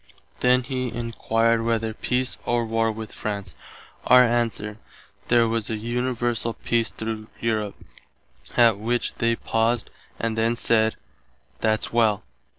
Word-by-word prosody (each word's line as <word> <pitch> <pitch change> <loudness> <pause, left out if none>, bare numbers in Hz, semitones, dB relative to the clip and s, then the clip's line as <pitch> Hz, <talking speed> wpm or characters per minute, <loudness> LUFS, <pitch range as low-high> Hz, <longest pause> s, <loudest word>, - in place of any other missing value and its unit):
Then 125 0 +4
he 130 -1 -3
enquired 115 -1 0
whether 115 -1 0
peace 125 +3 -1
or 120 -1 0
war 115 0 +1
with 110 0 -7
France. 100 -2 -5 0.5
Our 125 0 +8
answer, 115 -3 -1 0.5
there 120 -1 +4
was 115 -1 -1
an 110 -2 -2
universall 120 0 -1
peace 115 -1 0
through 110 -1 -5
Europe, 110 -3 -1 0.8
att 115 -4 +5
which 120 +3 -1
they 115 -1 +2
paused 115 0 0 0.3
and 115 -1 -1
then 115 +1 +1
said, 110 -2 +2 0.6
"That's 110 0 0
well." 110 -3 +3
115 Hz, 130 wpm, -24 LUFS, 110-120 Hz, 0.8 s, Our